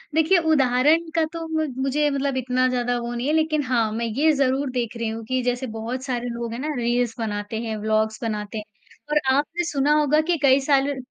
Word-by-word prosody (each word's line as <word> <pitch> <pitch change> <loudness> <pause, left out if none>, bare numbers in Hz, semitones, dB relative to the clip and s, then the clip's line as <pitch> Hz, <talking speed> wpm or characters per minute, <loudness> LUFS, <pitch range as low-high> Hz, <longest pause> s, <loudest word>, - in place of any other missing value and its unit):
देखिए, 320 +4 +4
उदाहरण 305 +1 +3
का 325 - +3
तो 330 -1 -5
म 315 -1 0 0.2
मुझे 295 +2 +1
मतलब 275 -1 -1
इतना 255 0 +1
ज़्यादा 245 -1 0
वो 235 0 -4
नहीं 240 +2 -3
है 300 - +1
लेकिन 310 -1 +1
हाँ, 235 -4 +1
मैं 230 +2 -2
ये 280 +8 +2
ज़रूर 275 0 +1
देख 240 -2 -3
रही 230 -1 -2
हूँ 225 0 -5
कि 255 +3 -1
जैसे 245 +1 -1
बहुत 240 +4 -4
सारे 245 -3 -3
लोग 235 -1 -4
हैं 240 - -5
ना, 300 +2 -2
रील्स 240 -1 0
बनाते 210 -1 -3
हैं, 220 -2 -4
ब्लॉग्स 220 0 0
बनाते 210 -1 -3
हैं। 215 - -4 0.5
और 300 - +3 0.2
आपने 305 +5 0
सुना 290 -3 0
होगा 300 0 +3
कि 340 - +3
कई 270 0 +6
साल 275 0 +2
अ, 280 - -3
255 Hz, 220 wpm, -23 LUFS, 235-295 Hz, 0.5 s, कई